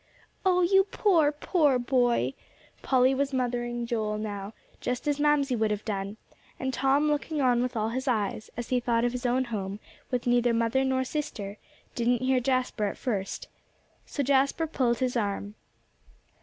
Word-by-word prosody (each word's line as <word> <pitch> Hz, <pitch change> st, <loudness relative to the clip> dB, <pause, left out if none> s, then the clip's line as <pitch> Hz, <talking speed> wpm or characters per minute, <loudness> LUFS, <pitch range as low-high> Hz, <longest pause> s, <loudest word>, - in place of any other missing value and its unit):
"Oh, 365 Hz, -1 st, +3 dB
you 385 Hz, +2 st, +5 dB
poor, 350 Hz, -7 st, +3 dB
poor 295 Hz, -2 st, +2 dB
boy!" 245 Hz, -, +1 dB, 0.5 s
Polly 260 Hz, 0 st, +3 dB
was 275 Hz, +1 st, -1 dB
mothering 240 Hz, -1 st, -1 dB
Joel 215 Hz, -3 st, -1 dB
now, 205 Hz, -1 st, -5 dB, 0.2 s
just 250 Hz, +3 st, -3 dB
as 290 Hz, -1 st, +1 dB
Mamsie 290 Hz, -3 st, +3 dB
would 220 Hz, -1 st, +1 dB
have 210 Hz, 0 st, -3 dB
done; 200 Hz, -1 st, -3 dB, 0.4 s
and 265 Hz, 0 st, -2 dB
Tom 270 Hz, +4 st, +2 dB
looking 295 Hz, +1 st, -1 dB
on 250 Hz, -3 st, +3 dB
with 250 Hz, 0 st, -2 dB
all 220 Hz, 0 st, 0 dB
his 260 Hz, +4 st, -3 dB
eyes, 215 Hz, -3 st, -1 dB
as 240 Hz, -, -5 dB
he 255 Hz, -, +2 dB
thought 235 Hz, -1 st, +1 dB
of 245 Hz, -, +1 dB
his 250 Hz, 0 st, -2 dB
own 255 Hz, +2 st, +2 dB
home, 205 Hz, -4 st, -4 dB, 0.3 s
with 250 Hz, -2 st, -2 dB
neither 240 Hz, -1 st, +3 dB
mother 230 Hz, +3 st, +2 dB
nor 260 Hz, 0 st, +1 dB
sister, 215 Hz, -8 st, -4 dB, 0.3 s
didn't 245 Hz, +1 st, +1 dB
hear 260 Hz, 0 st, +3 dB
Jasper 255 Hz, -3 st, 0 dB
at 200 Hz, -, -3 dB
first. 200 Hz, -7 st, -3 dB, 0.6 s
So 285 Hz, -, -2 dB
Jasper 275 Hz, +4 st, +2 dB
pulled 250 Hz, -6 st, 0 dB
his 255 Hz, +1 st, -1 dB
arm. 205 Hz, -2 st, -2 dB
250 Hz, 170 wpm, -28 LUFS, 225-270 Hz, 0.6 s, you